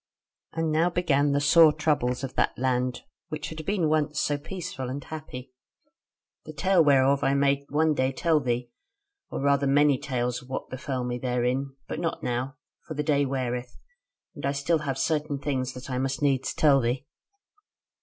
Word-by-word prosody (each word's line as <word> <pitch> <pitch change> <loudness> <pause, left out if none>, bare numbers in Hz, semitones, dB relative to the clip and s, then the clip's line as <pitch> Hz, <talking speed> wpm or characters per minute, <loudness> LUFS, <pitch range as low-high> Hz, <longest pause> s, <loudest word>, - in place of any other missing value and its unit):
"And 165 -1 -1
now 160 +3 +3
began 145 -5 +2
the 140 - +2
sore 155 +2 +7
troubles 145 -5 0
of 130 - -4
that - - 0
land, 125 -1 -1 0.3
which 155 - -5
had 160 0 -7
been 195 -5 +1
once 150 -1 +1
so 145 - +1
peaceful 155 -4 -6
and 140 +2 -5
happy; 135 -5 -8 0.9
the 155 - -9
tale 180 +3 +3
whereof 140 -1 +4
I 135 - +2
may 140 0 +1
one 155 +2 +2
day 130 -2 +1
tell 160 +3 +2
thee; 125 -2 -2 0.6
or - - -4
rather 140 0 +2
many 145 -1 +4
tales 125 -3 -2
of 125 - -17
what 130 - -5
befell 130 0 -3
me 125 0 -3
therein; 125 +2 -1
but - - -4
not 165 -1 -3
now; 125 +3 -2 0.3
for 155 - -6
the 150 - -1
day 145 -1 +2
weareth; 125 -2 -3 0.6
and - - -10
I 140 - 0
still 145 +4 +1
have 140 -3 -3
certain 150 +1 0
things 130 -2 -2
that 125 0 -9
I 130 -2 -2
must 135 0 -1
needs 135 -2 0
tell 145 -3 +5
thee. 125 +3 -1
140 Hz, 180 wpm, -26 LUFS, 130-150 Hz, 0.9 s, sore